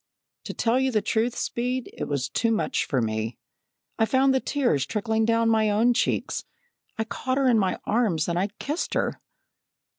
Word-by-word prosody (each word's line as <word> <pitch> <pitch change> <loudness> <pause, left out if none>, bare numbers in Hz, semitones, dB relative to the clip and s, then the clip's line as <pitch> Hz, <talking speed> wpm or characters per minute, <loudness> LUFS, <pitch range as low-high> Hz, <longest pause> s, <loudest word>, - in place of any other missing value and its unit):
"To - - -5
tell 235 +2 +2
you 265 0 +1
the 215 -3 +1
truth, 230 +2 0
Speed, 250 +1 -2
it - - -4
was 140 -2 -1
too 230 - 0
much 165 -9 0
for 130 -4 0
me. 110 +1 -2 0.6
I 225 - +3
found 265 +2 +3
the 265 - +3
tears 255 - +1
trickling 220 +1 0
down 230 0 +2
my 220 -1 +3
own 225 +4 +3
cheeks. 245 - -1 0.5
I 220 - 0
caught 255 +3 -3
her 275 -1 +3
in 235 -3 +4
my 190 -2 0
arms 205 -9 +1
and 180 +4 0
kissed 300 +5 -3
her." - - -1
225 Hz, 180 wpm, -25 LUFS, 185-245 Hz, 0.6 s, in